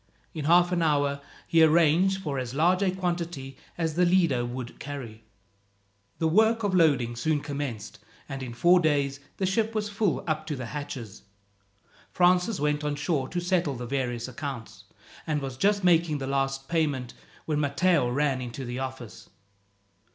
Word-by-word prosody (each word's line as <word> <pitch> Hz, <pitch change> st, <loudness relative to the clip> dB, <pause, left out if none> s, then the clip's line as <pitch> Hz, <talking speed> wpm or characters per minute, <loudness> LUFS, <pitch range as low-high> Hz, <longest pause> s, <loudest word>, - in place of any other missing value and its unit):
In 155 Hz, -3 st, -4 dB
half 175 Hz, +2 st, +5 dB
an 175 Hz, -1 st, +1 dB
hour 145 Hz, -3 st, +1 dB, 0.2 s
he 165 Hz, -, +3 dB
arranged 170 Hz, +4 st, +4 dB
for 140 Hz, -4 st, -2 dB
as 125 Hz, 0 st, -5 dB
large 175 Hz, +5 st, +3 dB
a 195 Hz, -, +2 dB
quantity 175 Hz, -7 st, -3 dB, 0.2 s
as 165 Hz, -2 st, -1 dB
the 180 Hz, +3 st, +2 dB
Lido 170 Hz, -9 st, +3 dB
would 120 Hz, 0 st, -7 dB
carry. 130 Hz, -6 st, -7 dB, 1.0 s
The 160 Hz, -, +1 dB
work 220 Hz, +6 st, +3 dB
of 200 Hz, -2 st, 0 dB
loading 140 Hz, -9 st, +3 dB
soon 150 Hz, +6 st, 0 dB
commenced, 140 Hz, -7 st, -5 dB, 0.3 s
and 135 Hz, -1 st, -6 dB
in 120 Hz, -2 st, -6 dB
four 175 Hz, +8 st, +5 dB
days 140 Hz, -4 st, +1 dB, 0.2 s
the 190 Hz, -, 0 dB
ship 220 Hz, +4 st, 0 dB
was 210 Hz, -1 st, -1 dB
full 205 Hz, -2 st, 0 dB
up 155 Hz, -2 st, -2 dB
to 150 Hz, -, -2 dB
the 130 Hz, -2 st, -5 dB
hatches. 125 Hz, -6 st, -7 dB, 0.9 s
Francis 180 Hz, +3 st, +3 dB
went 150 Hz, +1 st, 0 dB
on 150 Hz, -1 st, -1 dB
shore 145 Hz, -3 st, -1 dB
to 175 Hz, -, -2 dB
settle 175 Hz, -5 st, 0 dB
the 120 Hz, 0 st, -6 dB
various 120 Hz, -2 st, -2 dB
accounts, 130 Hz, -2 st, -7 dB, 0.4 s
and 155 Hz, -2 st, 0 dB
was 135 Hz, -3 st, -5 dB
just 200 Hz, +8 st, +1 dB
making 170 Hz, -3 st, +3 dB
the 135 Hz, -, -4 dB
last 135 Hz, 0 st, -1 dB
payment 145 Hz, -7 st, -1 dB, 0.3 s
when 150 Hz, -2 st, 0 dB
Matteo 145 Hz, -1 st, +2 dB
ran 135 Hz, 0 st, 0 dB
into 125 Hz, +2 st, -6 dB
the 120 Hz, +1 st, -4 dB
office. 130 Hz, -3 st, -7 dB
150 Hz, 165 wpm, -27 LUFS, 130-175 Hz, 1.0 s, half